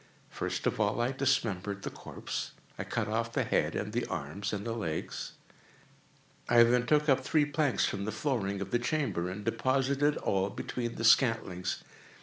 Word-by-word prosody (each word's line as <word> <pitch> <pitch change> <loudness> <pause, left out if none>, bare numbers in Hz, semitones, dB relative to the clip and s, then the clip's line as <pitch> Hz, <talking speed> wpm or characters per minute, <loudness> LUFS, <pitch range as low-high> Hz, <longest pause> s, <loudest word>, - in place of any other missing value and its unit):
First - - -3
of - - 0
all 105 +1 +1
I 120 +2 +1
dismembered 105 -8 0
the - - -4
corpse. - - -5 0.3
I - - -1
cut 115 -2 -2
off 115 +2 -1
the - - +1
head - - +1
and 105 0 -3
the 120 +1 -1
arms 90 +7 -4
and 100 -1 -3
the 115 - -1
legs. 85 -9 -4 1.2
I 120 0 +8
then 125 +1 +3
took 150 +1 +3
up 135 -2 +5
three 150 +1 +3
planks 150 -3 +1
from 100 0 -2
the 110 - -2
flooring 105 -5 -1
of 100 - -5
the 120 - +2
chamber, 120 - -1
and 100 +3 -6
deposited 135 +5 +1
all 95 0 0
between 120 +3 -4
the 115 - -4
scantlings. 115 -7 +3
115 Hz, 175 wpm, -31 LUFS, 100-130 Hz, 1.2 s, I